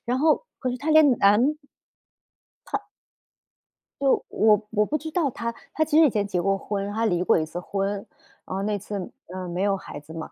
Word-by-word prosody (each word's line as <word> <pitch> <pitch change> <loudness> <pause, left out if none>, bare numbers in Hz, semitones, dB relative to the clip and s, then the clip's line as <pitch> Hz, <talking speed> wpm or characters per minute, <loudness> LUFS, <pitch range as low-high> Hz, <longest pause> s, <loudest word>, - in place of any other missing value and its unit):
然 245 +2 +1
后 310 - +3 0.2
可 255 - -1
是 245 - -3
她 315 +4 -2
连 310 -3 +7
男 230 +10 +4 1.2
她 - - -2 1.1
就 275 -1 +3
我 215 -1 +4
我 210 -1 +2
不 305 - -1
知 315 +2 -7
道 315 -5 +1
她， 230 0 -3 0.2
她 315 - +2
其 310 0 +1
实 320 - +8
以 - - +5
前 210 -2 0
结 180 -3 -1
过 195 +1 +1
婚， 200 0 -3
她 225 +1 0
离 180 -4 +1
过 - - +4
一 155 - -1
次 165 +3 -6
婚。 195 +2 -3 0.4
呃， 190 +1 -3
那 210 0 0
次， 200 -2 -5 0.2
呃， 185 0 -6
没 175 +2 -3
有 200 -1 +2
孩 165 -6 -8
子 150 +2 -13
嘛， 165 -1 -7
210 Hz, 220 characters per minute, -25 LUFS, 195-265 Hz, 1.2 s, 实